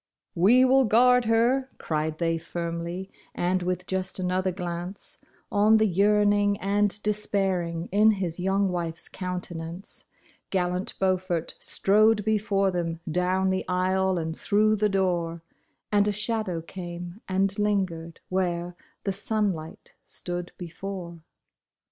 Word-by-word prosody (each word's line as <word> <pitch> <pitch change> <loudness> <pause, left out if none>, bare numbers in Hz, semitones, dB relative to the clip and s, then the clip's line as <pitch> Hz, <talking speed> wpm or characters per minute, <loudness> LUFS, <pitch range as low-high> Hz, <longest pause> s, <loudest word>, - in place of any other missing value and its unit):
" - - -55
We 255 +4 +7
will 265 0 +5
guard 250 +3 +5
her," 240 +4 +2
cried 155 0 -2
they 165 -1 0
firmly; 170 +3 -5 0.2
and 180 +1 0
wiUi 180 0 -2
just 190 0 -3
another 185 0 0
glance 175 +1 -6 0.3
On 210 +2 +5
the 220 - +3
yearning 205 +1 +3
and 205 +1 +1
despairing 190 -5 -1
in 215 +2 +5
his 180 -4 -3
young 195 +2 +1
wife's 170 -2 -3
countenance, 180 -1 -6 0.4
Gallant 180 0 -1
Beaufort 185 -3 0
strode 210 +1 +3
before 200 -2 +1
them 170 -2 -2
down 185 +2 +1
the 190 - -1
aisle 185 +1 +1
and 160 -1 -3
through 215 +3 +2
the 210 0 +2
door, 175 -4 0 0.5
And 205 0 +3
a - - +2
shadow 210 -5 -2
came 175 +2 -8
and 195 +1 +1
lingered 185 -6 -1
where 175 -1 -1 0.3
the 195 - -1
sunlight 195 -6 -2
stood 175 0 -3
before. 175 0 -7
190 Hz, 125 wpm, -26 LUFS, 175-205 Hz, 0.5 s, We